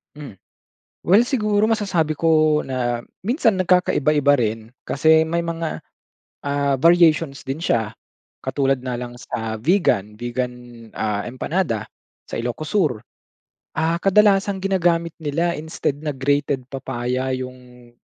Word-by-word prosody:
Hmm, 145 -9 -10 0.7
well 200 +6 +6
siguro 215 -5 +1
masasabi 175 -9 0
ko 155 -1 +3
na 120 -2 -1 0.2
minsan 230 - +2
nagkakaiba-iba 155 -6 +3
rin. 115 -3 0 0.2
Kasi, 160 +3 +4
may 165 +2 -1
mga, 165 -1 -3 0.7
ah, 140 -1 +1
variations 165 -2 +4
din 135 +2 -2
siya. 110 -6 0 0.5
Katulad 135 -2 0
na 125 -1 -3
lang 120 0 -6
sa 110 -2 -4
Vigan 110 - +1
Vigan, 125 +1 -2 0.4
ah, 105 -1 -2
empanada, 125 - -2 0.4
sa - - -4
Ilocos 120 +6 -4
Sur. 150 - +1 0.8
Ah, 165 +2 0
kadalasang 195 0 +3
ginagamit 170 -3 +1
nila 165 +3 0
instead 155 -3 -3
na 155 - -5
grated 140 -1 0
papaya 130 -1 -3
yong 125 -1 -10
145 Hz, 120 wpm, -21 LUFS, 125-170 Hz, 0.8 s, well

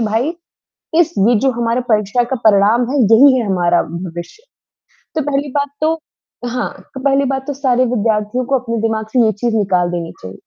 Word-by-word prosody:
भाई, 225 +7 0 0.7
इस 345 - +2 0.2
ये 240 - +4
जो 265 - +3
हमारे 235 +1 0
परीक्षा 210 +3 +2
का - - +1
परिणाम 215 +4 +4
है, 290 - 0 0.2
यही 265 +1 +6
है 230 - -2
हमारा 175 -2 +2
भविष्य। 175 - -8 0.7
तो 310 - +1
पहली 280 +1 -1
बात 285 0 -1
तो 315 +1 +2 0.6
हाँ, 240 -7 -2 0.2
तो 265 - -6
पहली 275 +1 +2
बात 265 0 -5
तो 290 - -2
सारे 255 -2 +1
विद्यार्थियों 220 +2 0
को 270 0 +1
अपने 230 -2 -4
दिमाग 220 -1 -2
से 245 -3 +4
ये 215 - +2
चीज़ 225 +2 -2
निकाल 180 -4 +1
देनी 170 -1 -4
चाहिए। 95 +1 -8
230 Hz, 190 wpm, -16 LUFS, 205-265 Hz, 0.7 s, यही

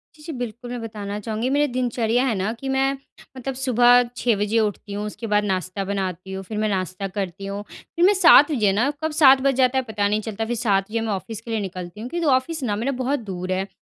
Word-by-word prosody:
जी, 300 - -17
जी। 325 - -6
बिल्कुल, 245 0 -6
मैं 245 -2 -4
बताना 210 -2 -5
चाहूँगी 220 +4 -2
मेरी 290 +2 +2
दिनचर्या 245 -1 +1
है 240 -5 0
ना 195 +3 -1
कि 270 - -5
मैं 270 +1 +2 0.4
मतलब 265 +1 -4
सुबह 245 -1 +5
6 235 -3 +2
बजे 210 +3 +1
उठती 205 -1 -2
हूँ, 205 +1 -3
उसके 225 +2 -6
बाद 210 0 +2
नाश्ता 190 0 -2
बनाती 190 -2 -3
हूँ, 190 0 -5
फिर 210 +2 -6
मैं 215 0 0
नाश्ता 185 0 -2
करती 195 -1 -5
हूँ। 200 +1 -4
फिर 345 +1 -1
मैं 405 - +6
7 330 -5 +7
बजे 215 -8 +2
ना 240 +7 +2
कब 315 - 0
7 275 -4 +6
बज 275 0 +2
जाता 260 0 +3
है 260 - +1
पता 205 -2 0
नहीं 210 +1 0
चलता 220 0 -4
फिर 240 +1 -2
7 205 -4 +1
बजे 225 +1 -1
मैं 225 -1 -2
ऑफ़िस 215 +3 -6
के 230 0 -8
लिए 220 - 0
निकलती 185 0 -6
हूँ 245 - -6
क्योंकि 340 -1 -2
ऑफ़िस 295 +3 -2
ना 210 -5 0
मेरा 235 +6 -1
बहुत 275 +3 0
दूर 185 -4 -5
है 190 +1 -1
220 Hz, 250 wpm, -23 LUFS, 200-255 Hz, 0.4 s, 7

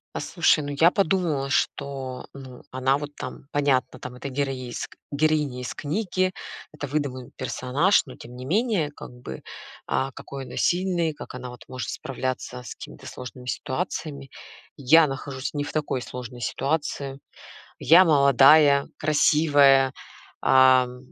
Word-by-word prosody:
Послушай, 155 - +2
ну, 145 0 -4
я 170 +2 +6
подумала, 170 -8 0
что, 135 -2 -2
ну, 130 -2 -11
она 130 +2 +1
вот 145 0 -7
там, 130 +1 -8
понятно 140 -3 +1
там 125 - -8
это 125 +3 -7
героиз 130 -3 -3 0.2
героиня 150 -3 0
из 125 - -5
книги, 185 +3 -1 0.4
это 150 -1 -6
выдуманный 135 -3 -3
персонаж, 130 +9 +1
но 130 - -11
тем 125 - -12
не 125 +1 -8
менее 195 - +1
как - - -9
бы, 125 - -9 0.5
а, 135 +1 0
какой 135 +1 -8
она - - -10
сильный, 175 -3 +1
как - - -10
она 125 0 -7
вот 125 -1 -11
может 130 0 -5
справляться 130 -1 -4
с 125 - -9
какими-то - - -11
сложными 125 0 -9
ситуациями. 140 0 -4 0.5
Я 155 +3 +5
нахожусь 135 -1 -5
не 145 - -1
в - - -6
такой 150 -4 -1
сложной 125 -1 -8
ситуации. 140 +2 -2 0.6
Я- 175 +4 +6
молодая, 140 -1 +6
красивая, 145 -3 +4 0.5
ам, 130 -1 +4
140 Hz, 140 wpm, -25 LUFS, 130-155 Hz, 0.6 s, я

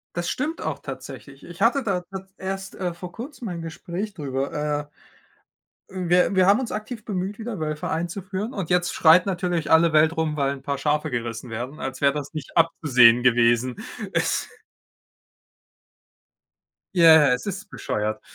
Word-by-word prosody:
Das 175 0 -2
stimmt 310 +6 -3
auch - - -3
tatsächlich. - - -9
Ich - - -11
hatte 275 - +3
da 190 -5 -1
ta 190 +1 -9
erst, 195 0 -5
äh, 180 -2 -3
vor 175 +1 -9
Kurzem 245 - -8
ein 175 -3 -5
Gespräch 175 +5 -5
drüber. 145 0 -3 1.0
Äh, 190 - -8
wir 180 +2 +3
wir 185 -1 +4
haben 205 +6 +4
uns 245 - -4
aktiv 215 +1 -6
bemüht, 200 0 -4
wieder 220 -5 -5
Wölfe 155 -1 -3
einzuführen 190 +6 -3
und 190 -6 -4
jetzt 175 -1 +1
schreit 165 +3 +6
natürlich 175 -4 -1
alle 165 0 +5
Welt 155 +1 +4
rum, 155 -1 -1
weil 140 -1 +1
'n 135 - -10
paar 140 +1 -3
Schafe 150 +2 0
gerissen 120 0 -4
werden, 125 +6 -6
als 130 0 -4
wäre 140 -1 +3
das 145 0 -5
nicht 155 -4 -7
abzusehen 130 -8 +5
gewesen. 120 0 +3 0.4
Es - - 0 2.5
Ja, 165 -2 +8 0.2
ja. - - +4
Es 125 - -3
ist 200 +2 -5
bescheuert. 110 +1 -3
165 Hz, 165 wpm, -24 LUFS, 140-190 Hz, 2.5 s, Ja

